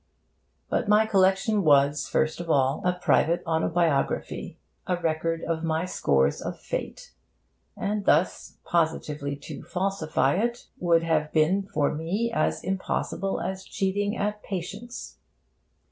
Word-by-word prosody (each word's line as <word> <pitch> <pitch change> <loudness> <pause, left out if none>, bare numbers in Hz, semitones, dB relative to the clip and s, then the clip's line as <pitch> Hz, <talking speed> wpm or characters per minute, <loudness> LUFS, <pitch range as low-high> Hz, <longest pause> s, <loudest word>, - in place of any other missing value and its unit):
But 235 - -1
my 210 +1 +5
collection 195 +1 +3
was, 145 -1 +4
first 155 +1 0
of 170 -1 -6
all, 135 -2 +2
a 180 - +3
private 175 -1 +2
autobiography, 160 -2 0 0.3
a 180 - +1
record 165 0 -1
of 165 -1 -2
my 160 +1 0
scores 70 - +1
of - - -5
Fate; - - -5 0.6
and 205 0 -2
thus 165 +5 +1
positively 150 -4 -1
to - - -7
falsify 180 -3 0
it 235 +3 -1
would 170 -2 +3
have 155 -2 +1
been 165 +5 +3
for 145 -2 +1
me 185 +10 -1
as - - 0
impossible 195 +1 -2
as 190 0 -4
cheating 205 +3 -1
at 210 +1 -2
'Patience.' 205 +6 -6
175 Hz, 130 wpm, -26 LUFS, 155-195 Hz, 0.6 s, my